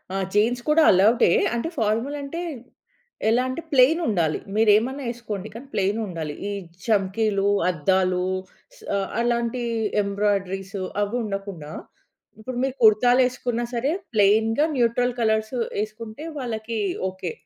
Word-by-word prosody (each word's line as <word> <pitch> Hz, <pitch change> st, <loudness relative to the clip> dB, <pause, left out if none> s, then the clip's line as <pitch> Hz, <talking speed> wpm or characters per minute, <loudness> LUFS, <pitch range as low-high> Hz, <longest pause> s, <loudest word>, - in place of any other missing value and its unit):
ఆహ్, 195 Hz, -, -1 dB
జీన్స్ 230 Hz, +4 st, +2 dB
కూడా 315 Hz, +1 st, +5 dB
అలోవ్‌డే, 200 Hz, +3 st, +4 dB, 0.3 s
అంటే 280 Hz, +8 st, -2 dB
ఫార్మల్ 225 Hz, +7 st, 0 dB
అంటే 330 Hz, +5 st, -5 dB, 0.9 s
ఎలా 245 Hz, +3 st, +3 dB
అంటే 260 Hz, -, -4 dB
ప్లెయిన్ 280 Hz, +5 st, +5 dB
ఉండాలి. 170 Hz, -7 st, +1 dB, 0.2 s
మీరు 220 Hz, 0 st, +4 dB
ఏమన్నా 265 Hz, +5 st, -3 dB
ఎసుకోండి 215 Hz, -4 st, -6 dB
కానీ 250 Hz, +5 st, -10 dB
ప్లెయిన్ 200 Hz, +3 st, 0 dB
ఉండాలి. 160 Hz, -5 st, -5 dB, 0.2 s
ఈ -, -, -3 dB, 0.3 s
చంకీలు, 200 Hz, -1 st, +1 dB, 0.2 s
అద్దాలు 185 Hz, +2 st, +1 dB, 0.6 s
స -, -, -18 dB, 0.4 s
అలాంటి 235 Hz, +1 st, 0 dB, 0.4 s
ఎంబ్రాయిడరీసు 195 Hz, -1 st, -1 dB, 0.2 s
అవి 205 Hz, +4 st, -1 dB
ఉండకుండా 195 Hz, -7 st, -5 dB, 0.7 s
ఇప్పుడు 240 Hz, +3 st, -6 dB
మీరు 265 Hz, -1 st, -1 dB
కుర్తాలు 245 Hz, +4 st, +6 dB
ఏసుకున్న 245 Hz, -1 st, -3 dB
సరే, 255 Hz, +5 st, 0 dB, 0.2 s
ప్లెయిన్‌గా 220 Hz, +7 st, +3 dB
న్యూట్రల్ 245 Hz, +1 st, +2 dB
కలర్స్ 220 Hz, +1 st, +1 dB, 0.3 s
వేసుకుంటే 220 Hz, +5 st, -6 dB
వాళ్ళకి 225 Hz, -3 st, -4 dB, 0.3 s
ఓకే. 185 Hz, -3 st, -5 dB
220 Hz, 125 wpm, -24 LUFS, 195-245 Hz, 0.9 s, కుర్తాలు